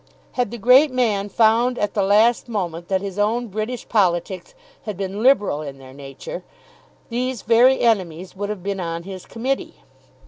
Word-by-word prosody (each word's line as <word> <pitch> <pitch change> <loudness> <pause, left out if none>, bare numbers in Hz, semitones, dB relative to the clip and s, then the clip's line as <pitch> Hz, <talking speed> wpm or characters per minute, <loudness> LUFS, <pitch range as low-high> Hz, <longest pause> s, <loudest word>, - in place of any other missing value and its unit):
Had 250 -4 -1
the 235 - -7
great 255 +7 +6
man 220 -6 0
found 235 +3 +3
at 210 - -1
the 205 - +1
last 215 +5 +3
moment 175 -6 -3
that 190 -1 0
his 200 0 -5
own 225 +3 0
British 215 +5 -4
politics 190 - 0 0.3
had 210 -4 -5
been 195 +1 -4
liberal 210 - +3
in 140 -2 -7
their 130 -1 -13
nature, 135 -1 -8 0.7
these 245 -1 -3
very 240 +4 +4
enemies 185 -6 0
would 205 +1 -4
have 210 -4 -5
been 200 0 -3
on 170 -1 -4
his 185 0 -9
committee. 260 +4 -3
205 Hz, 170 wpm, -21 LUFS, 185-235 Hz, 0.7 s, great